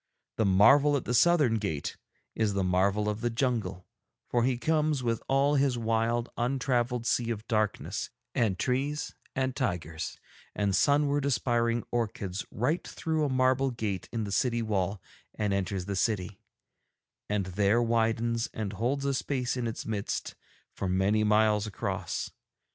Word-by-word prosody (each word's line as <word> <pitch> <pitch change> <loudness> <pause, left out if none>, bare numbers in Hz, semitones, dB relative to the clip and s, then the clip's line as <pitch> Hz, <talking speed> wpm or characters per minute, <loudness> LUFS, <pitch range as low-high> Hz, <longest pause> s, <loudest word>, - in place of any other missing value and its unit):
The 110 - +2
marvel 140 +10 +6
at 130 - -5
the 125 - -1
southern 135 -4 +4
gate 90 -9 -3 0.4
is 105 -3 0
the 100 - +1
marvel 100 +3 +2
of 105 +1 -2
the 120 - +1
jungle, 115 -7 -1 0.4
for 120 -1 +1
he 125 0 +1
comes 150 +1 +1
with 115 -2 0
all 135 +2 +3
his 135 -3 +2
wild 115 +1 0
untravelled 125 -1 0
sea 120 -1 +1
of 110 -1 -4
darkness 110 -2 -1 0.2
and 105 -6 +1
trees 140 +6 -1 0.2
and 130 -1 0
tigers 85 - -3 0.4
and 100 -2 +1
sunward 145 +6 +3
aspiring 120 -2 +1
orchids 105 -5 -2
right 145 +10 0
through 160 -2 -1
a - - 0
marble 130 +1 +2
gate 110 -7 -4
in 115 -2 -2
the 100 - -4
city 120 +2 +1
wall 100 -2 -1 0.4
and 105 -2 0
enters 95 -1 -2
the 100 0 -3
city, 100 -2 -1 0.9
and 105 -2 0
there 100 +4 +2
widens 115 0 +1
and 105 -2 -3
holds 130 +7 -1
a 140 - +1
space 130 -2 -1
in 125 -2 -2
its 115 - -5
midst 105 -3 -3 0.5
of 95 - -1
many 100 +4 +2
miles 105 0 +3
across. 105 - -3
115 Hz, 155 wpm, -29 LUFS, 100-130 Hz, 0.9 s, marvel